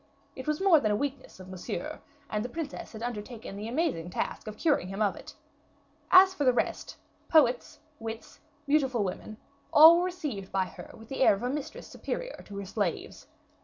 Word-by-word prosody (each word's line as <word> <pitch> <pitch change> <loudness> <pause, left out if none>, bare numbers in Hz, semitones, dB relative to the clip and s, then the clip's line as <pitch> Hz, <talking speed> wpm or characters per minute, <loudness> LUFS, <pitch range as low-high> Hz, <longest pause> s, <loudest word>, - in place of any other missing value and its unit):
It 260 - -8
was 305 0 0
more 380 -5 +6
than 215 - 0
a 210 - +2
weakness 275 -2 -4
of 185 - -11
Monsieur, 190 +11 -6 0.3
and 210 -3 -2
the 245 - -5
princess 305 -2 -6
had 220 +1 -7
undertaken 230 -2 -6
the 210 +2 -6
amazing 245 - -1
task 180 - -4
of 215 0 -7
curing 290 - +1
him 195 +2 -6
of 205 -3 +1
it. - - -11 0.7
As 375 0 +8
for 295 - -2
the 255 - +5
rest, 245 - -2 0.3
poets, 260 -6 +3 0.2
wits, 225 0 -8 0.3
beautiful 270 -6 +2
women, 200 +3 -5 0.3
all 320 +3 +9
were 355 - +1
received 295 - -5
by 190 -1 +1
her - - -11
with 225 +1 -14
the 270 - -4
air 255 - +6
of 195 - -8
a 250 - 0
mistress 295 +1 -5
superior - - -6
to 200 - -8
her 200 - -5
slaves. 200 -3 -3
245 Hz, 195 wpm, -29 LUFS, 210-300 Hz, 0.7 s, all